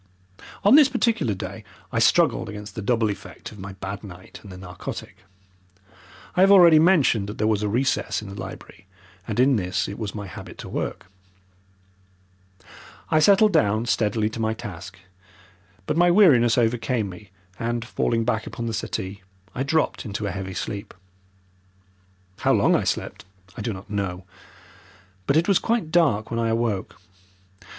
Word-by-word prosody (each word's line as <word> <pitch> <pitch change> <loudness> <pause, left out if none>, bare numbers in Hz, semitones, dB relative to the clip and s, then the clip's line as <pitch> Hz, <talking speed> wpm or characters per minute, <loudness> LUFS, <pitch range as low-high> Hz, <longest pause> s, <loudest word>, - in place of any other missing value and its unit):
On 205 - +6
this 290 -1 +8
particular 230 - 0
day 95 - -7 0.3
I - - 0
struggled 115 - +3
against 105 0 -8
the 110 - -5
double 115 0 +1
effect 100 - -9
of 105 - -13
my 95 +1 -7
bad 95 +2 -7
night 95 -2 -11
and 100 - -12
the 90 - -9
narcotic. 90 -1 -8 1.2
I 180 - +3
have 195 - +6
already 170 -5 +8
mentioned 155 - +3
that 105 - -7
there 110 - 0
was 110 -2 +1
a 105 - 0
recess 130 +5 0
in 105 - -9
the 100 - -8
library, 95 0 -10 0.4
and 110 +1 -3
in 130 0 +4
this 90 -2 -1
it 100 - -7
was 105 -2 -5
my 105 -1 -5
habit 90 - -10
to - - -9
work. - - -4 2.1
I 155 - +4
settled 200 +5 +5
down 110 -7 +2
steadily 110 -2 +1
to 115 - -7
my 110 0 0
task, 100 -3 -9 0.9
but 150 - -1
my 175 +1 +5
weariness 145 - +5
overcame 115 -1 0
me 95 +1 -11 0.3
and, 120 0 -2
falling 115 -1 -1
back 110 -2 -1
upon 120 - -5
the 115 - -3
settee, 100 -2 -4 0.3
I 125 - -4
dropped 155 +4 0
into 105 -2 -4
a 100 - -2
heavy 95 0 -6
sleep. 100 +1 -5 1.4
How - - +2
long - - +3
I - - 0
slept - - -3 0.3
I - - -6
do 115 +2 -2
not 95 0 -9
know, 100 -4 -4 1.0
but 140 - +3
it 165 - +2
was 200 -3 +4
quite 225 -9 -1
dark 140 -12 +2
when 115 - -1
I 115 - +1
awoke. 115 -5 -2
110 Hz, 170 wpm, -24 LUFS, 100-135 Hz, 2.1 s, this